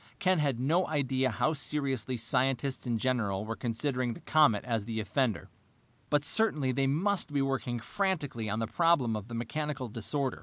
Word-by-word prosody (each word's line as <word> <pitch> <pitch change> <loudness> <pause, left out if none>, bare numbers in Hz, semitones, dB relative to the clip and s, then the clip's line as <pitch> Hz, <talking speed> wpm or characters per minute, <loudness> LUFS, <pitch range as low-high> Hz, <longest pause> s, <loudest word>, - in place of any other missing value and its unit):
Ken 185 -2 +2
had 140 -5 +1
no 165 +8 +2
idea 135 -3 +1
how 155 +6 +1
seriously 135 -5 -2
scientists 130 +3 0
in 120 -1 +1
general 110 -5 0
were 115 +1 -3
considering 125 +1 -1
the - - -10
comet 145 -9 +4
as 115 -4 -1
the 110 0 -3
offender, 115 +1 -1 0.6
but 145 -1 +2
certainly 155 -6 +1
they 135 +1 +1
must 175 +4 +1
be 145 - +1
working 135 -3 -1
frantically 145 - -2
on 110 - -1
the 115 - 0
problem 135 -3 +2
of 105 -1 -5
the 120 - -6
mechanical 135 +3 -3
disorder. 120 - -2
130 Hz, 175 wpm, -30 LUFS, 115-150 Hz, 0.6 s, comet